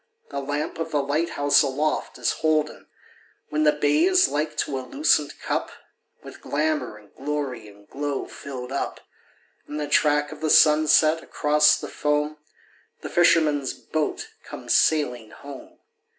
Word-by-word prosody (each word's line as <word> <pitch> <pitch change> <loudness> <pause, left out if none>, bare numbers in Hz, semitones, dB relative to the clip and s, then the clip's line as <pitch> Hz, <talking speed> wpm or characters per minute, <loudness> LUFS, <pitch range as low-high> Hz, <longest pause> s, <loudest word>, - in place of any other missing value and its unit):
The 140 - -3
lamp 145 +3 -4
of 165 0 -3
the 145 -3 0
light 150 +5 -1
house 145 0 +4
aloft 145 +2 -2
is - - 0
holden; 155 -1 -1 0.6
When 155 +1 0
the 150 - +6
bay 150 - +2
is 370 0 +4
like 150 +2 -3
to 135 - -2
a - - -5
lucent 150 - 0
cup - - -2 0.5
With - - -12
glamor 150 -6 -2
and 105 -1 -20
glory 135 -5 -4
and 100 0 -17
glow 145 -1 -4
filled 130 -2 -8
up. 140 - -4 0.7
In 150 - -6
the 150 -1 -3
track 150 0 +2
of 155 - -10
the 155 - -1
sunset, 155 +1 +5
across 150 +1 +3
the - - -7
foam. 150 +1 -1 0.6
The - - -6
fisherman's 155 -5 +2
boat 375 - -3
comes - - -4
sailing 125 -8 +1
home. 310 - -12
150 Hz, 150 wpm, -24 LUFS, 140-155 Hz, 0.7 s, the